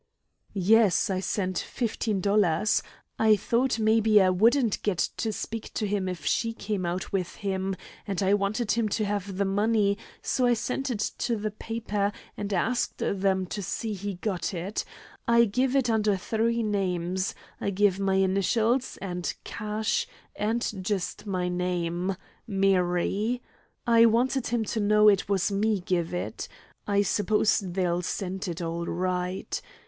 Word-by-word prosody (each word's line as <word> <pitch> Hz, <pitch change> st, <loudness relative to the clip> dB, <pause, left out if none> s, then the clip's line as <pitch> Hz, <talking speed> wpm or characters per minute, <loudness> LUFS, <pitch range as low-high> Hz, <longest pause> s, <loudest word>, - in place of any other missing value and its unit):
"Yes; 200 Hz, +1 st, +4 dB
I 185 Hz, -, 0 dB
sent 185 Hz, -1 st, -1 dB
fifteen 220 Hz, -4 st, -2 dB
dollars. 200 Hz, -1 st, +2 dB, 0.4 s
I 220 Hz, -1 st, +6 dB
thought 235 Hz, +5 st, +1 dB
maybe 220 Hz, -1 st, +4 dB
I 185 Hz, -1 st, +4 dB
wouldn't 230 Hz, +4 st, +3 dB
get 205 Hz, -4 st, 0 dB, 0.2 s
to 220 Hz, -, -1 dB
speak 225 Hz, +1 st, -5 dB
to 215 Hz, -, 0 dB
him 200 Hz, -2 st, -1 dB
if 170 Hz, -5 st, -6 dB
she 230 Hz, -1 st, +1 dB
came 205 Hz, -5 st, -3 dB
out 180 Hz, +3 st, -3 dB
with 185 Hz, -3 st, -1 dB
him, 190 Hz, -1 st, -2 dB, 0.3 s
and 200 Hz, -1 st, -1 dB
I 195 Hz, +1 st, +3 dB
wanted 205 Hz, +3 st, 0 dB
him 225 Hz, -2 st, +1 dB
to 215 Hz, +1 st, 0 dB
have 200 Hz, -2 st, -3 dB
the 200 Hz, -, +1 dB
money, 205 Hz, +1 st, +2 dB, 0.2 s
so 250 Hz, -1 st, +1 dB
I 240 Hz, -, +4 dB
sent 265 Hz, +4 st, -2 dB
it 215 Hz, -4 st, -1 dB
to 240 Hz, -1 st, 0 dB
the 215 Hz, 0 st, -3 dB
paper, 210 Hz, -2 st, -2 dB, 0.2 s
and 205 Hz, 0 st, -4 dB
asked 225 Hz, +6 st, 0 dB
them 190 Hz, -1 st, 0 dB
to 175 Hz, +4 st, -5 dB
see 215 Hz, +3 st, -3 dB
he 200 Hz, 0 st, -4 dB
got 180 Hz, -1 st, -2 dB
it. 185 Hz, +5 st, -3 dB, 0.4 s
I 235 Hz, 0 st, +6 dB
give 250 Hz, +5 st, 0 dB
it 265 Hz, -3 st, +3 dB
under 215 Hz, -3 st, +2 dB
three 230 Hz, +4 st, 0 dB
names: 185 Hz, -3 st, -1 dB, 0.2 s
I -, -, -1 dB
give 200 Hz, -1 st, +2 dB
my 195 Hz, -1 st, +1 dB
initials, 205 Hz, +6 st, +1 dB
and 180 Hz, -2 st, -2 dB
'Cash,' 215 Hz, +1 st, -2 dB, 0.3 s
and 225 Hz, +3 st, 0 dB, 0.2 s
just 195 Hz, +1 st, -3 dB
my 185 Hz, -2 st, -1 dB
name 180 Hz, +1 st, -1 dB, 0.3 s
'Mary.' 195 Hz, +3 st, +1 dB, 0.5 s
I 230 Hz, -1 st, +6 dB
wanted 250 Hz, +3 st, +1 dB
him 230 Hz, -1 st, 0 dB
to 220 Hz, -, -2 dB
know 210 Hz, 0 st, +5 dB
it 200 Hz, -1 st, +2 dB
was 200 Hz, 0 st, +1 dB
me 205 Hz, +1 st, +1 dB
give 175 Hz, -2 st, -1 dB
it. 180 Hz, -, -4 dB, 0.4 s
I 200 Hz, 0 st, +3 dB
suppose 210 Hz, +2 st, +2 dB
they'll 180 Hz, -2 st, -1 dB
send 190 Hz, +1 st, -3 dB
it 170 Hz, 0 st, -4 dB
all 170 Hz, +1 st, -3 dB
right. 180 Hz, +1 st, -2 dB
200 Hz, 155 wpm, -27 LUFS, 185-220 Hz, 0.5 s, I